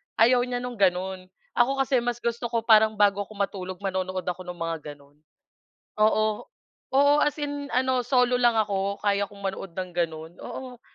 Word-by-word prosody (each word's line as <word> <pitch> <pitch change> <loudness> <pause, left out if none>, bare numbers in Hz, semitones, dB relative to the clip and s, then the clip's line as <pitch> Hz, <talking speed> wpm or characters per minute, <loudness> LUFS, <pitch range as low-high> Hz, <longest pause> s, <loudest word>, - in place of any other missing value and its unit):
ayaw 245 +3 +5
niya 245 0 -3
no'ng 245 -4 -6
gano'n, 185 0 +1 0.3
ako 240 +3 +4
kasi 260 -2 +2
mas 240 0 -3
gusto 235 0 -1
ko, 230 -1 -1
parang 220 -1 +5
bago 205 -1 +3
ako 215 - -13
matulog 190 -2 -4
manonood 185 -1 -2
ako 180 0 -5
ng 180 - -5
mga 165 -3 -4
gano'n. 140 0 -22 0.9
Oo, 215 0 +2 0.4
oo, 285 +2 +4
as 295 +1 +1
in 290 -1 -4 0.3
solo 250 0 +2
lang 240 -2 +3
ako, 200 -2 0
kaya 200 -1 0
kong 200 -1 -10
manood 190 -2 -5
ng 185 -1 -4
gano'n, 160 -2 -2
oo. 250 -2 -8
205 Hz, 170 wpm, -26 LUFS, 185-240 Hz, 0.9 s, ayaw